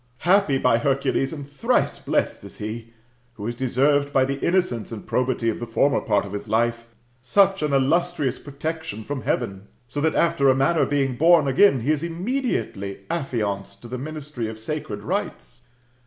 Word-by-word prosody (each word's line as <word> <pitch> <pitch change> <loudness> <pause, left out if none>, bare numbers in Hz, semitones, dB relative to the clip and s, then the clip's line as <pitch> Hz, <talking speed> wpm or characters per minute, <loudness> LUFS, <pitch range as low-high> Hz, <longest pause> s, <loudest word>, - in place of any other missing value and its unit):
Happy, 180 -6 +4
by 115 -3 +3
Hercules, 135 +1 0
and 145 -4 -7
thrice 145 -1 0
blessed - - -1
is - - -10
he! 115 +2 -6 0.4
who 105 -3 -8
has 120 - -2
deserved, 140 +3 +1
by 135 -2 +3
the 135 +1 -3
innocence 170 - 0
and 110 -3 -7
probity 125 -2 0
of 115 - 0
the 120 - -5
former 135 +5 +2
part 105 -2 +1
of 100 - -8
his 105 - -5
life, 115 +2 0 0.3
such 195 +9 +3
an 150 -1 0
illustrious 145 0 +1
protection 150 -4 -5
from 140 +2 -4
heaven; 100 -1 -2 0.2
so 145 +4 -4
that, 160 +1 +1
after 170 -5 +3
a 130 - +5
manner 135 +5 +2
being 135 -3 0
bofn 165 +3 +5
again^ 170 - +5
he 145 - +2
is 150 -2 0
immediately 170 - -3
affianced 105 -10 -3
to - - -8
the 125 +1 -5
ministry 145 -4 -5
of 110 0 -6
sacred 110 -4 -5
rites." 145 - -4
135 Hz, 175 wpm, -23 LUFS, 115-155 Hz, 0.4 s, a